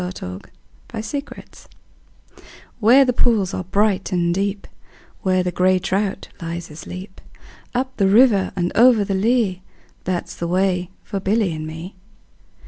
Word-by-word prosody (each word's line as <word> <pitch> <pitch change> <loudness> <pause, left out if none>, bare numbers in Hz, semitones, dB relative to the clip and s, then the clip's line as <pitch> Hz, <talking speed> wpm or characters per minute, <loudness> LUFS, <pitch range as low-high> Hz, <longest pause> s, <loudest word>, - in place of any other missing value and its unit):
A 180 - -3 0.8
Boy's 220 -2 -6
Song 280 +4 -6 1.3
WHERE 245 +5 +6
the 250 - +1
pools 210 -6 +2
are 185 - -3
bright 200 +1 +1
and 170 -1 +1
deep, 200 +1 -2 0.6
Where 185 -2 +2
the 180 - -1
grey 185 +2 +3
trout 195 +2 -2
lies 170 0 -5
asleep, 185 +5 -9 0.5
Up 260 +1 -1
the 195 - +3
river 210 -1 +5
and 175 0 -1
over 235 -2 +6
the 195 - -2
lea, 200 -2 +1 0.4
That 180 -1 -2
's - - -9
the 170 - -3
way 180 0 +1
for 195 - -4
Billy 195 -1 +1
and 155 0 -5
me. 160 +4 -8
190 Hz, 145 wpm, -21 LUFS, 180-215 Hz, 1.3 s, WHERE